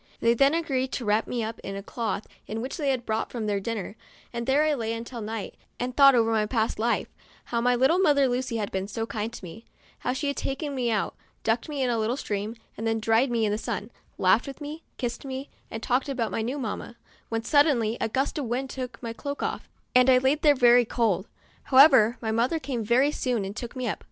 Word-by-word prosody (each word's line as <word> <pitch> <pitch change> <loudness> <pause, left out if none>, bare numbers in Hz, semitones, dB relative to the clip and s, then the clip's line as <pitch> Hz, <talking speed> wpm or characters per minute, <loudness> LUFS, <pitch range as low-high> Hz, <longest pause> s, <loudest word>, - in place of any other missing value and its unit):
They 230 - +4
then 275 +6 +4
agreed 270 -6 -1
to 245 - -3
wrap 210 +2 +2
me 240 -2 -2
up 220 0 -5
in 195 - -6
a 195 - -6
cloth 215 -2 -3 0.2
in 220 - -4
which 255 +7 -4
they 290 -4 0
had 255 -3 -1
brought 220 0 -1
their 215 -4 -2
dinner, 210 -1 -4 0.4
and 235 0 -4
there 280 +3 +4
I 310 -1 +2
lay* 230 -4 -2
until 235 +1 -6
night 215 0 -5 0.3
and 245 0 -3
thought 275 -2 +8
over 225 -1 +3
my 215 -1 +2
past 220 -2 0
life; 235 +2 +1 0.4
how 235 -1 -1
my 245 +1 +3
little 270 +9 +3
mother 290 -7 +4
Lucy 250 -1 -1
had 210 -2 -3
been 190 0 -2
so 225 +2 -3
kind 220 0 -3
to 235 - -9
me; 180 +7 -10 0.4
how - - -1
she 280 +2 -1
liad - - -20
taken 280 +2 -3
me 250 -3 0
out, 215 -3 0 0.3
ducked 230 +5 0
me 285 -3 -1
in 250 - +1
a 230 - 0
little 225 +4 0
stream, 210 -2 -3 0.2
then 225 0 0
dried 225 +4 +3
me 230 -2 +1
in 210 - +1
the 210 - -1
sun, 220 -1 -4 0.3
laughed 190 +7 +3
with 275 - -7
me, 300 +2 -7 0.2
kissed 240 -2 -3
me, 270 0 -6 0.2
and 225 - -6
talked 255 +3 +1
about 240 -5 -1
my - - -1
new 250 +6 -2
mamma, 235 -2 -5 0.3
when 225 0 -2
sud 290 +4 +5
denly 230 -6 +1
a 225 - 0
gust 270 +6 -1
of 280 - -2
wind 255 +3 -2
took 250 -3 -5
my 230 -1 -4
cloak 285 +4 -5
off, - - -3 0.2
and 250 0 +6
I 255 - +7
laid 265 +4 +2
there 295 -2 +5
very 245 -1 +6
cold. 215 -5 0 0.4
However, 260 -4 +7
my 220 -2 -1
mother 235 +8 +1
came 260 -6 -3
very 255 +7 +3
soon 245 -8 -1
and 195 +2 -6
took 240 0 -6
me 255 -1 -2
up. - - -2
240 Hz, 240 wpm, -26 LUFS, 225-265 Hz, 0.4 s, thought